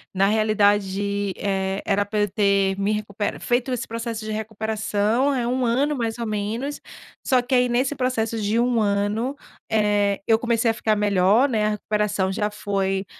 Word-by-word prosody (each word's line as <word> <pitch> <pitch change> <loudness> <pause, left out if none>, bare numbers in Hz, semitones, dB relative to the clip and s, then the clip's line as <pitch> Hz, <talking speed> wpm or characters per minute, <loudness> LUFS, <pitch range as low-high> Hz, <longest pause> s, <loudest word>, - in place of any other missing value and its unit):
na 195 +1 +3
realidade, 205 -2 +1
eh, 195 -1 -2
era 205 0 +1
pra 210 +1 -2
eu 205 - +1
ter 195 -1 +2
me 200 +2 +1
recuperado 210 -1 -3
feito 245 +1 0
esse 245 - -3
processo 230 -1 -5
de 215 - -5
recuperação, 220 +3 -1
é 245 -2 -1
1 250 +1 0
ano 270 +6 +1
mais 230 -2 -2
ou 235 - -3
menos, 220 +7 -3 0.5
só 255 -2 +4
que 245 +2 -4
aí 250 -1 +4
nesse 255 +4 0
processo 230 -4 -1
de 210 +2 0
1 240 -2 +2
ano, 210 +5 0 0.3
eh, 205 -2 +1
eu 225 -1 +3
comecei 230 -1 +1
a - - -3
ficar 220 -1 0
melhor, 205 +5 +3
né, 220 -4 +1
a - - +2
recuperação 210 -2 -1
já 210 +2 -1
foi 195 -2 -2
215 Hz, 175 wpm, -23 LUFS, 200-235 Hz, 0.5 s, só